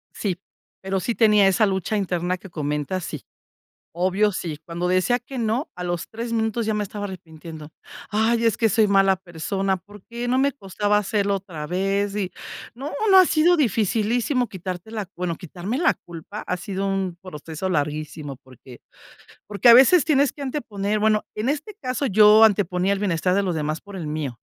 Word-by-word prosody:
Sí. 185 -4 -2 0.4
Pero 190 0 -2
sí 235 +5 -2
tenía 210 -3 +5
esa 210 +3 +3
lucha 190 +2 -1
interna 180 -2 -1
que 195 - -12
comentas, 150 +3 -3
sí. 150 -3 -6 0.7
Obvio, 190 +4 +2
sí, 165 -5 -4
cuando 170 +1 -3
decía 185 +7 +2
que 260 +1 -9
no, 230 +5 -1
a 180 - -6
los 175 -1 -3
3 230 +1 -5
minutos 225 0 0
ya 220 - 0
me 210 - -1
estaba 205 0 -5
arrepintiendo. 160 -4 -9 0.4
"Ay, 225 +2 +1
es 225 -3 +2
que 225 - +3
soy 215 +1 +3
mala 195 -1 +4
persona, 190 +2 -2
¿por 205 +2 -15
qué?", 235 +1 -5
no 255 +1 +2
me 280 +1 +3
costaba 205 -3 -1
hacerlo 200 0 0
otra 175 -6 -6
vez. 195 +2 -1
Y 190 -3 -2 0.4
no, 275 +6 -6 0.2
no, 380 - +8
ha 370 - +7
sido 330 +3 +4
dificilísimo 235 - +1
quitarte 185 +1 -6
la 215 -4 -5
bueno, 180 -2 -2
quitarme 180 - -5
la 345 +4 +3
culpa 175 +5 -9
ha 180 - -1
sido 195 +2 -3
un 190 -3 -2
proceso 165 0 -6
larguísimo, 150 -2 -3
porque, 130 -1 -15 0.7
porque 205 +3 +3
a 235 - +11
veces 270 +6 +7
tienes 285 -2 +2
que 290 - -11
anteponer, 215 -7 -2
bueno, 215 0 +2
en 215 +3 -3
este 305 +9 -2
caso, 255 +3 -2
yo 215 -1 +7
anteponía 195 -3 +3
el 200 - 0
bienestar 180 -2 0
de 200 - +2
los 180 -3 -1
demás 155 +1 -2
por 200 -1 -12
el 175 - -5
mío. 150 -6 -4
195 Hz, 185 wpm, -23 LUFS, 180-225 Hz, 0.7 s, a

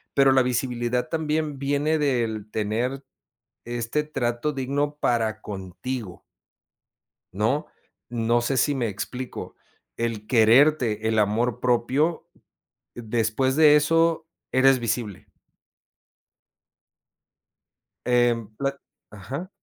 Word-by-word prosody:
pero 135 -1 +5
la 130 - +5
visibilidad 125 +1 -1
también 155 -2 -1
viene 145 +3 +1
del 115 -7 -1
tener 120 +6 -2 0.6
este 120 +5 -2
trato 135 -1 -2
digno 145 +2 -2
para 110 -2 0
contigo 95 +2 -6 1.1
¿no? 110 +10 0 0.4
No 120 0 +1
sé 130 +3 -1
si 145 +3 +2
me 120 -4 -1
explico, 125 +5 -6 0.4
el 115 -2 -3
quererte, 115 -1 +4
el 110 -1 +1
amor 110 +3 +1
propio, 130 +7 +1 0.7
después 120 +3 0
de 150 -2 +7
eso 165 +2 +2 0.3
eres 130 0 +5
visible. 110 -3 -3 2.8
Em, 120 -2 +2
pla 140 0 -1 0.3
ajá. 130 - -7
125 Hz, 95 wpm, -24 LUFS, 115-140 Hz, 2.8 s, de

